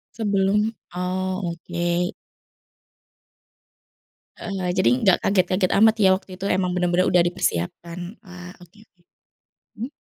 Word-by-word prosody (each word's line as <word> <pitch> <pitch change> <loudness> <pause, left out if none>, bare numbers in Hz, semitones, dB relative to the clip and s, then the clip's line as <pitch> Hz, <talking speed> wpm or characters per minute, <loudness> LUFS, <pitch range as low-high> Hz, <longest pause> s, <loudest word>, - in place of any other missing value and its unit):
Sebelum 205 0 +1 0.2
oh 185 +1 -2
oke. 175 +1 -2 2.3
Heeh, 185 -3 -3
jadi 185 - +3
enggak 200 -7 +4
kaget-kaget 185 -1 +1
amat 220 +1 +6
ya 190 - +6
waktu 190 -1 -13
itu 185 - -8
emang 185 -1 0
bener-bener 180 0 +1
udah 180 -1 +4
dipersiapkan 175 - -3
wah 180 -4 -11
oke 180 +3 -18
oke, 200 -5 -27 0.8
hmm? 240 - -3
185 Hz, 115 wpm, -23 LUFS, 180-195 Hz, 2.3 s, amat